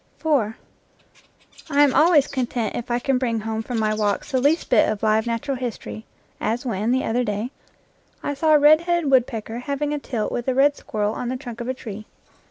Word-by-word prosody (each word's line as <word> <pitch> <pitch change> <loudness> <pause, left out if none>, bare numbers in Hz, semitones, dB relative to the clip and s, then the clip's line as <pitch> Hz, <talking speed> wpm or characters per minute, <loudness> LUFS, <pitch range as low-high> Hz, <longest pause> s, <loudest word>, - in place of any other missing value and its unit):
I 240 -9 +2 1.3
am 280 -3 +3
always 310 -3 +5
content 245 -4 -2
if 240 - -5
I 240 - +1
can 255 +1 0
bring 230 -4 -1
home 220 0 -3
from 240 +1 -4
my 215 -1 +1
walks 210 +2 -1
the 260 -2 +1
least 300 +5 +1
bit 235 - +5
of 215 0 -3
live 220 +1 +2
natural 245 +4 -2
history, 235 -3 -6 0.3
as 230 +4 -2
when, 220 -1 -1
the 260 +1 +1
other 245 +2 0
day, 210 +2 -3 0.7
I 285 - -1
saw 310 +2 +3
a - - +6
red 305 +2 +6
headed 345 -4 0
woodpecker 235 -3 +1
hav 280 +2 -4
ing 295 0 -1
a 295 - -2
tilt 235 -6 -3
with 240 - -3
a 260 - +1
red 285 +2 +4
squirrel 210 -4 -2
on 240 - -4
the 255 - -2
trunk 240 -3 -8
of 235 - -5
a 260 - -2
tree. 215 -3 -8
245 Hz, 210 wpm, -23 LUFS, 220-275 Hz, 1.3 s, a